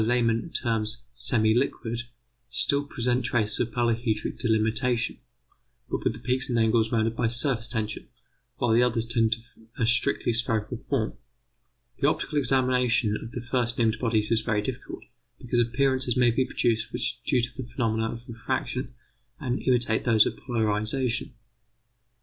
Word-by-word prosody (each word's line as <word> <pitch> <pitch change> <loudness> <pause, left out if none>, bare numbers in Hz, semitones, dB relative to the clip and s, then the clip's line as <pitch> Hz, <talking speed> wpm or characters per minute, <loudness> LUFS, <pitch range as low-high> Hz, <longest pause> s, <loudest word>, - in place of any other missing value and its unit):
Lehmann 115 +3 +1
terms 115 -3 -1
semi 115 -2 +2
liquid 120 -2 -1 0.5
still 140 +4 +1
present 125 -2 -1
traces 110 -3 0
of 120 - 0
polyhedric 115 -2 -1
delimitation, 115 +1 +1 0.7
but - - -2
with - - +1
the 110 - -10
peaks 130 +3 0
and 120 - +1
angles 110 0 +3
rounded 115 0 +1
by 115 0 +1
surface 120 0 +2
tension, 110 -3 -3 0.5
while 120 - +1
the 120 - +5
others 115 -2 +2
tend 115 -1 +1
to 110 - +2 0.4
a 115 - +1
strictly 120 0 +2
spherical 115 0 0
form. 125 -6 0 0.9
The - - +3
optical 150 - -1
examination 125 -4 +3
of 115 - -7
the 120 - -5
first 120 -1 -1
named 110 -1 +1
bodies 110 -2 +1
is 115 -1 +3
very 105 -2 0
difficult, - - -6 0.3
because 120 0 -1
appearances 130 +1 +1
may 120 -1 +5
be 130 +3 +1
produced 115 -2 0
which - - -3
are - - -6
due 125 - +3
to 125 - -4
the 120 - -8
phenomena 115 -2 0
of 120 +2 -9
refraction 125 +1 -3 0.4
and 125 -1 -2
imitate 120 -3 +2
those 110 -3 +5
of - - -2
polarization. 115 +1 0
120 Hz, 155 wpm, -26 LUFS, 110-125 Hz, 0.9 s, the